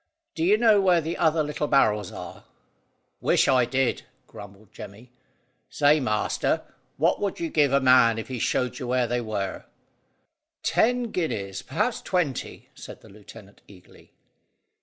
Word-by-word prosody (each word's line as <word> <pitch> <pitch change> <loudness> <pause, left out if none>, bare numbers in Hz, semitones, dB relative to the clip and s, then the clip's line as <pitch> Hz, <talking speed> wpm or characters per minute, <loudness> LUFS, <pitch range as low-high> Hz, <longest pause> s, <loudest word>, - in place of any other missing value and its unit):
"Do 160 - -3
you 200 +5 +4
know 220 -3 +4
where 180 -3 +3
the 165 +1 -4
other 160 -1 +1
little 150 0 -3
barrels 105 -7 +2
are?" - - -10 0.7
"Wish - - +2
I 130 -2 +3
did," 135 +1 -1 0.2
grumbled 100 0 -14
Jemmy. 115 +5 -12 0.6
"Say, 150 +1 +3
master, 105 -6 -1 0.3
what - - +1
would 200 -2 -3
you 165 -1 -4
give 145 -3 +2
a 140 - +3
man 125 -3 +4
if 115 - -6
he 130 -2 -5
showed 125 +4 -1
you 125 - -5
where 125 0 +1
they 120 +1 -2
were?" 105 -4 -4 1.0
"Ten 245 0 +1
guineas; 100 - -3
perhaps 235 - -2
twenty," 170 -9 -3
said - - -12
the - - -17
lieutenant 105 0 -15
eagerly. 95 -3 -19
130 Hz, 150 wpm, -25 LUFS, 110-160 Hz, 1.0 s, you